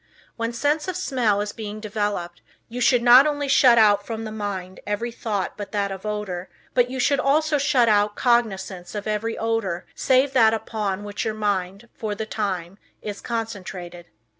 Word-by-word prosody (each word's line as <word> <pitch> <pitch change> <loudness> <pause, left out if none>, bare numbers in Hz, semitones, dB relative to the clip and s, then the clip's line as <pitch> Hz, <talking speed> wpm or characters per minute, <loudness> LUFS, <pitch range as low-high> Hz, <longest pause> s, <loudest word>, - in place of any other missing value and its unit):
When 230 0 -2
sense 295 +7 0
of 370 -1 -2
smell 240 - +1
is 205 0 -3
being 215 -1 -7
developed, 205 -5 -3 0.3
you 245 +2 -6
should 240 0 +4
not 250 +4 +8
only 290 -1 -1
shut 260 -3 +6
out 205 -2 +5
from 225 +1 -5
the 215 - -5
mind 195 -3 -5
every 220 +4 -2
thought 205 -5 -3
but 205 -1 -7
that 200 -1 0
of 195 +2 -6
odor, 200 -4 -4 0.2
but 245 -1 +3
you 260 +1 -5
should 275 +2 +2
also 300 +2 +2
shut 270 -4 +3
out 210 -1 +3
cognizance 195 -7 0
of 205 - -4
every 215 +1 -2
odor 225 -6 -1
save 265 +1 +2
that 225 -3 +5
upon 205 -3 -3
which 205 0 -4
your 220 -1 -2
mind, 200 0 -2
for 215 -2 -4
the 220 - -4
time, 195 -4 -3 0.2
is 205 -1 -6
concentrated. 190 -6 -5
215 Hz, 180 wpm, -23 LUFS, 200-240 Hz, 0.3 s, not